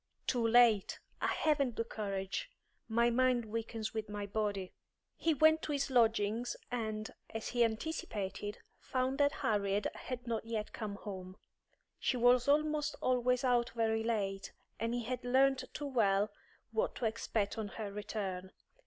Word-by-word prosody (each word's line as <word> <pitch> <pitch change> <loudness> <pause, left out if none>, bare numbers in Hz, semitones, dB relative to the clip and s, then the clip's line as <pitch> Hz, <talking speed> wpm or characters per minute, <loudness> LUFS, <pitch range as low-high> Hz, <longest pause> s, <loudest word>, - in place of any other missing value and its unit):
"Too 235 -2 +1
late! 225 -4 +5 0.2
I - - +2
haven't 280 -6 +1
the 230 - 0
courage. 200 - -3 0.4
My 235 +1 +3
mind 250 -1 +3
weakens 225 0 -4
with 215 -1 -3
my 205 -1 -3
body." 200 -2 -2 0.4
He 325 -2 +1
went 315 +2 +5
to - - -3
his 280 -1 -1
lodgings, 230 -1 +2 0.2
and, 220 -3 -3 0.2
as 225 0 -4
he 240 -1 +3
anticipated, 215 -5 -2 0.2
found 260 +2 -1
that 285 0 +5
Harriet 205 -1 +1
had 245 -1 -6
not 230 -2 -2
yet 225 -2 -4
come 210 -3 -4
home. 190 -3 -7 0.6
She 255 - +1
was 245 +1 +5
almost 300 0 +2
always 250 0 +2
out 245 -2 +3
very 225 -1 +1
late, 200 -4 -1 0.3
and 230 +2 -1
he 240 - -2
had 250 +1 -3
learnt 260 +1 +3
too 295 - -5
well 210 -6 +2 0.4
what 475 +3 0
to 245 - -2
expect 220 -1 -1
on 215 - -2
her 205 0 -5
return. 195 -3 -4
230 Hz, 155 wpm, -34 LUFS, 210-255 Hz, 0.6 s, late